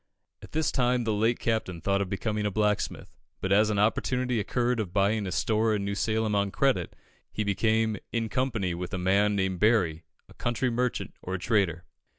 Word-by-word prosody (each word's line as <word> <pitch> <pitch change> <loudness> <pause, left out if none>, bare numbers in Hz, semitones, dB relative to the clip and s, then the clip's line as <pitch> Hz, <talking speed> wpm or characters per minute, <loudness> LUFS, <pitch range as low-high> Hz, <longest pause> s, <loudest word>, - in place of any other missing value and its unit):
At - - -13
this 155 0 +1
time 125 -1 +1
the 110 -1 0
late 110 +3 +2
Captain 110 -6 -1
thought 100 +4 0
of 95 - -2
becoming 105 +2 -1
a - - +1
blacksmith, 105 0 -1 0.2
but 95 - -3
as 105 +2 +5
an 105 - 0
opportunity 125 +3 +1
occurred 120 +3 0
of 100 -5 -3
buying 100 +1 +2
a - - -3
store 110 +2 +1
in 100 -1 -2
New 100 - -2
Salem 110 +1 0
on 100 0 +1
credit, 135 +6 0 0.4
he 110 - -2
became, 110 +2 +1
in 115 -1 -1
company 110 -7 -1
with 90 +1 -4
a - - -2
man 100 +3 +2
named 95 -2 -1
Berry, 95 -8 +2 0.2
a - - -16
country 120 +1 -1
merchant, 125 +1 -1
or 95 +1 -3
trader. 95 -5 0
105 Hz, 190 wpm, -28 LUFS, 100-115 Hz, 0.4 s, as